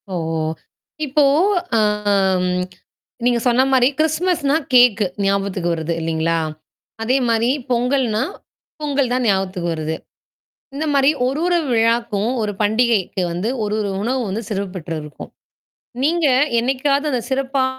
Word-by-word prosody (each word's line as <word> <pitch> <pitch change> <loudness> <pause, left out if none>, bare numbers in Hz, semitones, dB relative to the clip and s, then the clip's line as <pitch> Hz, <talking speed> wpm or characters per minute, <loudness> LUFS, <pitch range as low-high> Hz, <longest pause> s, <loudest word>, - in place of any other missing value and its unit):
ஓ! - - -6 0.9
இப்போ 295 +1 +2 0.5
அ - - +4 0.6
ம் 180 0 0 0.6
நீங்க 245 -1 +3
சொன்னா 245 +2 +4
மாரி 250 -1 +5
கிறிஸ்துமஸ்னா, 315 -2 +1 0.2
கேக்கு. 245 -4 +5 0.2
ஞாபகத்துக்கு 195 -2 0
வருது 165 0 -2
இல்லீங்களா? 165 +1 0 0.7
அதே 255 +4 +2
மாரி 230 +1 +2 0.2
பொங்கல்னா, 245 -2 +1 0.6
பொங்கல் 280 -4 0
தான் 250 -1 0
ஞாபகத்துக்கு 190 -3 0
வருது. 160 0 -3 0.8
இந்த 295 +3 -3
மாரி 275 0 +5 0.2
ஒரு, 270 +4 -1
ஒரு 350 -1 +3
விழாக்கும், 230 -2 +1
ஒரு 210 -1 -1
பண்டிகைக்கு 215 -3 +1
வந்து 180 +6 -2 0.2
ஒரு, 210 +1 -1
ஒரு 205 -2 -2
உணவு 230 -3 -2
சிறப்பு 200 -2 -3
பெற்றிருக்கும். 155 -3 -7 0.7
நீங்க 330 +1 +2 0.3
என்னைக்காவது 275 +4 0
அந்தச் 245 -1 -3
சிறப்பா 270 0 0
235 Hz, 120 wpm, -20 LUFS, 195-265 Hz, 0.9 s, மாரி